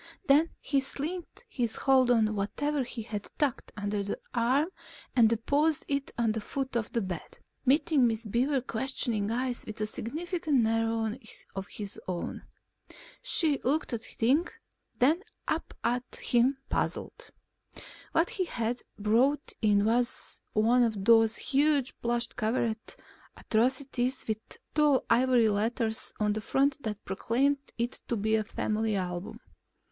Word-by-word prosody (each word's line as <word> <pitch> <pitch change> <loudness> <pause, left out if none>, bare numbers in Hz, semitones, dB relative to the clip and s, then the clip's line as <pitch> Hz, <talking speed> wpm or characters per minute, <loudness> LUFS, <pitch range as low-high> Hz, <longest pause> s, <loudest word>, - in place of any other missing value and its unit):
Then 300 +3 +5
he 280 - +1
slackened 325 - -5
his 245 - -1
hold 260 -2 +4
on 220 -3 +3
whatever 280 +8 -1
he 235 -2 -6
had 210 -2 -5
tucked 285 -5 -1
under 205 0 -2
one 200 0 -2 0.2
arm 255 +7 +2 0.5
and 230 -3 +6
deposited 285 +7 +1
it 280 0 -3
at 230 -2 +2
the 220 - -3
foot 265 +3 -4
of 230 -2 -1
the 230 - 0
bed, 180 -3 -6 0.3
meeting 285 -1 +4
Miss 225 0 -2
Beaver's 250 +5 +1
questioning 230 -4 -1
eyes 245 +1 -1
with 215 - -7
a 215 - +1
significant 310 - 0
narrowing 225 +1 0 0.3
of 195 0 -4
his 205 -2 -6
own. 180 -2 -4 0.8
She 320 - +2
looked 280 0 0
at 230 - -2
the - - -7
thing, 275 +9 +3 0.5
then 305 +8 +3 0.3
up 320 - -1
at 245 +1 -1
him, 250 +3 +2
puzzled. - - -3 0.8
What 330 +2 +2
he 380 -5 -1
had 235 -5 -2 0.2
brought 240 +8 +2
in 205 -2 +3
was 235 +2 0
one 230 +4 +4
of 215 -5 0
those 225 -1 +5
huge, 285 -2 +2
plush 235 0 +1
covered 225 0 -2 0.4
atrocities 255 +2 0
with 220 -1 -1 0.3
tall 300 -3 +3
ivory 245 -1 +4
letters 220 +2 0
on 210 -1 +2
the 215 - -3
front 275 +5 +1
that 210 -4 -5
proclaimed 255 +9 +1 0.2
it 240 +1 -2
to 235 - -1
be 220 +2 +1
a 220 - +1
Family 215 0 -1
Album. 180 -1 -4
240 Hz, 145 wpm, -29 LUFS, 220-275 Hz, 0.8 s, and